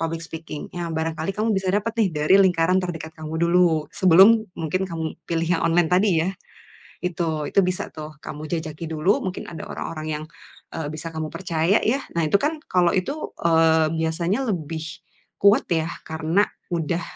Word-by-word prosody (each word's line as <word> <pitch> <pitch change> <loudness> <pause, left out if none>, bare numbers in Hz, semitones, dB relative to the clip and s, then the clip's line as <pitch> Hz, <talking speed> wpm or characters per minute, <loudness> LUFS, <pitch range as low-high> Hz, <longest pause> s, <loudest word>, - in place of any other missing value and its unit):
public 165 0 -2
speaking 160 -2 -7
ya 175 -1 -3
barangkali 160 +2 -2
kamu 220 +2 +1
bisa 190 -1 -1
dapet 210 +3 0
nih 215 -4 +4
dari 150 +4 +3
lingkaran 180 -1 +3
terdekat 165 -3 -5
kamu 155 0 -6
dulu. 170 -3 +3
Sebelum 195 +5 +6
mungkin 165 +3 -1
kamu 165 -2 -4
pilih 165 -1 0
yang - - -3
online 165 0 +3
tadi 190 +3 +4 0.2
ya. 190 - 0 0.7
Itu, 165 -4 -2
itu - - +4
bisa 180 0 -1
tuh 155 0 -8
kamu 150 +1 -7
jajaki 160 -1 -4
dulu 160 +6 +1
mungkin 185 -1 -4
ada 160 -2 -7
orang-orang 155 -1 -5
yang, 155 - -7 0.5
eee, 160 -2 -3
bisa 155 +1 -6
kamu 160 -1 -3
percaya 175 +2 +1
ya. 260 +6 +1 0.2
Nah - - +3
itu 150 - -4
kan, 310 +2 0
kalau 180 -1 +4
itu, 280 +12 -2 0.2
eee, 160 -1 +4
biasanya 170 +8 0
lebih 160 -4 -3 0.6
kuat 200 +1 +5
ya 160 -1 +1 0.2
karena 160 +5 +1 0.3
udah, 170 0 -1
165 Hz, 170 wpm, -23 LUFS, 160-185 Hz, 0.7 s, Sebelum